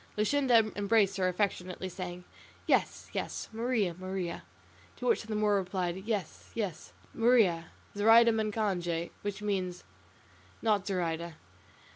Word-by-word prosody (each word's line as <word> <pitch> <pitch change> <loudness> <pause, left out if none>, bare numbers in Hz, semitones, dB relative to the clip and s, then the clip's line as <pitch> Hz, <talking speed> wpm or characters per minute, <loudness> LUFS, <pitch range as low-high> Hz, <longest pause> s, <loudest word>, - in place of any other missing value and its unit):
Luscinda 230 -1 +3
embraced 205 -1 +2
her 185 -1 +2
affectionately, 185 -1 -2
saying, 180 -1 -6 0.4
"Yes, - - +1
yes, - - -3
Maria, 225 -5 0
Maria," 185 -1 -4 0.5
to - - -7
which 470 - +3
the 220 -1 -5
Moor 210 -1 +3
replied, 185 -2 -2
"Yes, 210 -7 -3
yes, 195 -7 -4 0.2
Maria; 225 -8 +4 0.3
Zoraida 225 +3 +7
macange," 200 -6 -1
which 205 0 -4
means 185 -3 -2 0.8
"not 210 -3 +1
Zoraida." 170 -3 -2
200 Hz, 115 wpm, -31 LUFS, 180-220 Hz, 0.8 s, Zoraida